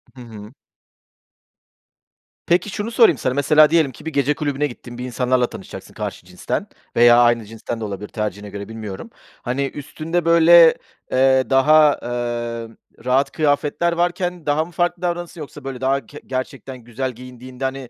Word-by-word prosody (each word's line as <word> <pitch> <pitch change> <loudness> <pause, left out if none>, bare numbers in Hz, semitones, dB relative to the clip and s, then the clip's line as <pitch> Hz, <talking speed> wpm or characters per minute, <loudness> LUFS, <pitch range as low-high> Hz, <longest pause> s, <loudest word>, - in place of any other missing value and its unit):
Hı 125 - -11
hı. 110 -1 -11 1.9
Peki, 180 +4 +2
şunu 210 +4 -4
sorayım 230 0 +5
sana: 130 - -1
Mesela 150 +2 +5
diyelim 160 -5 +2
ki 130 - -15
bir 160 - -5
gece 140 +1 +2
kulübüne 145 -1 -1
gittin, 120 -1 -11
bir 125 - -5
insanlarla 125 0 0
tanışacaksın, 95 - -10
karşı - - -6
cinsten - - -4 0.3
veya 120 0 +6
aynı 120 -2 +3
cinsten 115 +2 -6
de - - -5
olabilir, 100 0 -6
tercihine 105 -1 -4
göre, 100 +1 -8
bilmiyorum. 110 -4 -7 0.3
Hani 130 +3 -1
üstünde, 160 +4 -4
böyle, 170 0 +7 0.4
eee, 130 0 +3
daha, 150 +3 +5
eee, 120 -1 -3 0.4
rahat 135 +2 +2
kıyafetler 155 +3 0
varken 175 -1 -2
daha 150 +2 +1
mı 175 - -14
farklı 175 0 -1
davranırsın 175 -2 -4
yoksa 145 0 -10
böyle 135 -2 -6
daha 135 +1 0
ke 145 - -12
gerçekten 130 0 -5
güzel 125 +2 -5
giyindiğinde, 125 +1 -11
hani, 130 -1 -4
135 Hz, 160 wpm, -20 LUFS, 120-155 Hz, 1.9 s, böyle